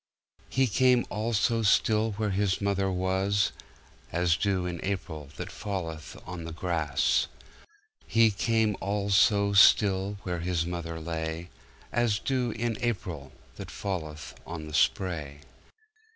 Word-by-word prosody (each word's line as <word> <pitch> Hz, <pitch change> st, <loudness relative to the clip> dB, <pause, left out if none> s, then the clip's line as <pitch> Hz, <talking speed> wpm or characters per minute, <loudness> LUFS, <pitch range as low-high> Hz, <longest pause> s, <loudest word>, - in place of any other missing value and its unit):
He 135 Hz, 0 st, +2 dB
came 125 Hz, +2 st, +3 dB
all 110 Hz, +3 st, -2 dB
so 115 Hz, +2 st, +2 dB
stillWhere 110 Hz, 0 st, +2 dB
His 95 Hz, 0 st, +1 dB
mother 100 Hz, -1 st, 0 dB
was, 95 Hz, +2 st, +1 dB, 0.6 s
As 85 Hz, 0 st, +2 dB
dew 95 Hz, -1 st, 0 dB
in 90 Hz, -1 st, -4 dB
AprilThat 90 Hz, -2 st, -5 dB
falleth 85 Hz, -7 st, -5 dB
on 90 Hz, -2 st, -6 dB
the 85 Hz, -, -6 dB
grass. 80 Hz, -4 st, +1 dB, 0.8 s
He 115 Hz, 0 st, +4 dB
came 110 Hz, 0 st, +1 dB
all 100 Hz, +1 st, -1 dB
so 100 Hz, +1 st, +4 dB
stillWhere 100 Hz, -3 st, +4 dB
His 85 Hz, -2 st, 0 dB
mother 85 Hz, -2 st, -4 dB
lay, 80 Hz, +1 st, -4 dB, 0.4 s
As 120 Hz, -3 st, +2 dB
dew 125 Hz, +2 st, -1 dB
in 115 Hz, 0 st, -2 dB
AprilThat 90 Hz, -, -5 dB
falleth 80 Hz, -7 st, -5 dB
on 80 Hz, -2 st, -6 dB
the 75 Hz, -, -9 dB
spray. 75 Hz, -4 st, 0 dB
95 Hz, 120 wpm, -28 LUFS, 85-105 Hz, 0.8 s, He